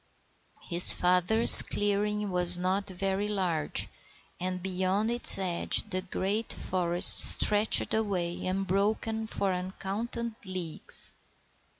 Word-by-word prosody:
His 175 0 +4
father's 180 +6 +8
clearing 205 0 -5
was 180 0 +2
not 185 +3 -6
very 195 +2 -7
large, 180 -7 -5 0.5
and 180 0 -8
beyond 190 +4 -5
its 240 +1 +4
edge 180 -3 -4
the 185 - -5
great 195 +4 -7
forest 175 -1 +1
stretched 210 +1 +1
away 185 -6 -6
unbroken 200 +4 -6
for 195 -3 -6
uncounted 200 +6 -9
leagues. 185 -4 -4
190 Hz, 100 wpm, -24 LUFS, 180-210 Hz, 0.5 s, father's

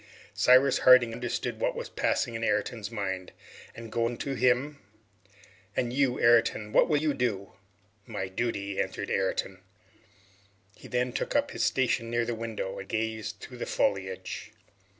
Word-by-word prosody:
Cyrus 130 +6 +5
Harding 125 -3 +6
understood 120 +1 -3
what - - 0
was 485 +1 -5
passing 120 - 0
in 115 0 -4
Ayrton's 110 0 -1
mind, 95 -5 -4 0.4
and 115 -1 -9
going 115 +1 -1
to 140 - -3
him 130 +3 +1 1.0
"And 120 -1 -1
you, 135 -2 +1
Ayrton," 115 -2 +4
he 105 - -8
asked, - - -14
"what - - +5
will 150 - +3
you 150 0 +1
do?" 105 -7 -2 0.5
"My 100 -4 -4
duty," 100 -1 -2
answered - - -4
Ayrton. 95 -1 -1 1.2
He - - -13
then 125 0 -1
took - - -3
up 290 0 +2
his - - -2
station 120 -3 +1
near 120 0 0
the 120 - -2
window 110 -4 -4
and 100 - -9
gazed 110 -1 -3
through 125 - -9
the - - -4
foliage. 95 +3 -2
115 Hz, 160 wpm, -28 LUFS, 105-125 Hz, 1.2 s, Harding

